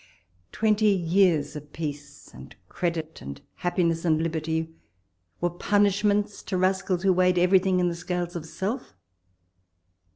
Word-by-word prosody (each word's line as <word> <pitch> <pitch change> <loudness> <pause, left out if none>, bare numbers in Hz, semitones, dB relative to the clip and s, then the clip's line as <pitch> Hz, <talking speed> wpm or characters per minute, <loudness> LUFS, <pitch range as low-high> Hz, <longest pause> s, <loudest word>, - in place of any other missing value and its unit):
twenty 215 -1 +2
years 175 -5 +2
of 150 0 -9
peace, 145 -2 -7
and - - -12
credit, 165 - -3
and 70 +1 -8 0.2
happi 175 0 +1
ness, 165 0 0
and 160 -3 +2
liberty, 160 0 -2 0.7
were 175 - +1
punishments 205 +2 +1
to 190 - -3
rascals 185 -1 0
who 190 -1 +4
weighed 180 0 +3
everything 185 +1 +4
in 180 - +2
the 175 - -1
scales 175 0 -4
of 170 - -4
self 190 - -4
175 Hz, 135 wpm, -26 LUFS, 160-190 Hz, 0.7 s, who